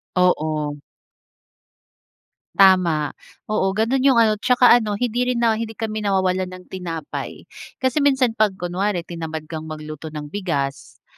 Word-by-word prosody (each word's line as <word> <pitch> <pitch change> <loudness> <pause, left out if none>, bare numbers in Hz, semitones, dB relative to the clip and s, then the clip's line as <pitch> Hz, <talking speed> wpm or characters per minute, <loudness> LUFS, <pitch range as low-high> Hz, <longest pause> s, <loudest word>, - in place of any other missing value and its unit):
Oo. 155 -4 +1 1.8
Tama, 175 -7 +4 0.4
oo, 195 -2 +1
gano'n 225 +5 +1
yung 265 -1 +4
ano 215 -2 +3
tsaka 250 +1 +5
ano 220 -4 +3
hindi 245 +2 -1
rin 240 -1 0
na 225 -1 +2
hindi 225 -1 -5
kami 215 0 -3
nawawalan 190 -2 0
ng 185 0 -11
tinapay 170 -5 -6 0.4
kasi 260 +3 +2
minsan 265 -4 +3
'pag 215 -3 +1
kunwari 180 +1 -2
tinamad 160 -2 -6
kang 160 -1 -5
magluto 155 0 -7
ng 150 -1 -7
bigas, 140 - -4
190 Hz, 135 wpm, -21 LUFS, 160-225 Hz, 1.8 s, tsaka